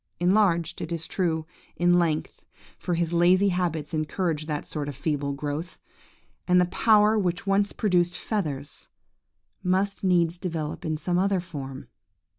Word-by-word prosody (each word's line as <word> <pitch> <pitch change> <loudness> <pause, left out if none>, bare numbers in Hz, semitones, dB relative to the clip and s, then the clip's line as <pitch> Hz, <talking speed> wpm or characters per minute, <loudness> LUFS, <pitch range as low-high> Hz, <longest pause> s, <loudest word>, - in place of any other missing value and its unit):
Enlarged, 180 -2 +2
it 160 - -5
is 165 -1 -3
true, 160 -4 -1 0.3
in 175 0 +4
length, 160 -3 -1 0.4
for 175 - -1
his 170 0 -1
lazy 180 +3 +4
habits 170 -5 -2
encourage 155 0 -1
that 150 -2 -3
sort 145 -2 -4
of 145 - -7
feeble 145 0 -1
growth; 145 +5 -4 0.7
and 180 0 +5
the 180 - +4
power 215 +3 +4
which 180 -2 -1
once 200 +1 +2
produced 180 -4 +1
feathers, 145 -10 -4 0.7
must 190 +3 0
needs 175 -2 +2
develop 165 -3 -4
in 155 -1 -1
some 175 +3 0
other 195 0 +2
form! 140 -7 -7
175 Hz, 145 wpm, -26 LUFS, 155-185 Hz, 0.7 s, and